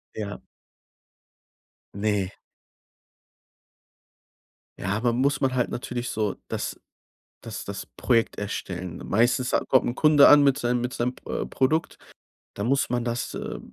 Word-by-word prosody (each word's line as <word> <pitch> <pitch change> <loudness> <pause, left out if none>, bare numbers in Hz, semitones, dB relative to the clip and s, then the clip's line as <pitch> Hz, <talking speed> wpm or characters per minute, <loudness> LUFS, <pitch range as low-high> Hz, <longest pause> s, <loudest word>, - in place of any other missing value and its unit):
Ja. 105 -1 -5 1.5
Ne. 100 -2 0 2.5
Ja, 100 +3 -1
man 120 -1 +1
muss 140 +3 +2
man 135 -2 +1
halt 125 -2 +1
natürlich 125 0 -4
so 105 -2 -1
das - - -4 0.6
das 110 -3 -6
das 100 -1 -5
Projekt 115 -3 0
erstellen, 90 -4 -4
meistens 120 +4 +2
ha - - +3
kommt 130 - +4
'n 120 - -1
Kunde 150 0 +6
an 145 0 +8
mit 140 -1 +4
sei 120 -4 0
mit 125 +1 -1
seinem 125 +1 -1
Pr - - -5
äh, - - -3
Produkt, 155 +5 0 0.6
da 100 - -3
muss 135 +4 +1
man 120 -1 -1
das, 120 +1 -3
äh, - - -5
120 Hz, 140 wpm, -25 LUFS, 105-130 Hz, 2.5 s, an